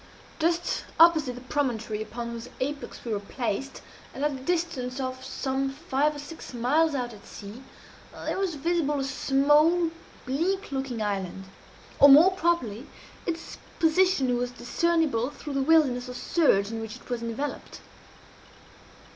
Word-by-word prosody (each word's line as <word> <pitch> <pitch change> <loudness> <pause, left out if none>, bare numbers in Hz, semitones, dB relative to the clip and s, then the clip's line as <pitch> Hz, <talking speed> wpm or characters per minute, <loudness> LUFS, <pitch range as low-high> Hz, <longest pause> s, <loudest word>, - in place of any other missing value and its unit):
Just 340 +2 0
opposite 320 -7 +6
the 250 - -9
promontory 240 -6 -2
upon 235 +2 -5
whose 235 +1 -7
apex 285 +1 -4
we 230 - -2
were 205 - -1
placed, 235 +5 -4 0.3
and 280 - -1
at 300 - +2
a - - -5
distance 275 -3 -2
of 260 0 -4
some 270 0 -2
five 295 0 0
or - - -7
six 290 -2 -9
miles 290 +6 +2
out 245 -3 -3
at 205 - -14
sea, 210 +4 -10 0.6
there - - -1
was 380 -4 -1
visible 295 -1 0
a - - -1
small, 295 +5 +3 0.3
bleak 345 +9 -1
looking 265 -5 -2
island; 195 -2 -3 0.6
or, 285 - +9
more 310 +7 +9
properly, 320 - -1 0.4
its 335 -1 -4 0.2
position 325 -6 +3
was 245 0 -1
discernible 255 0 0
through 295 0 -8
the 275 - +1
wilderness 265 -5 +3
of 250 - -6
surge 210 - +2
in 225 0 -4
which 220 -1 -6
it - - -15
was 245 -2 -3
enveloped. 235 +5 -5
270 Hz, 150 wpm, -27 LUFS, 245-320 Hz, 0.6 s, or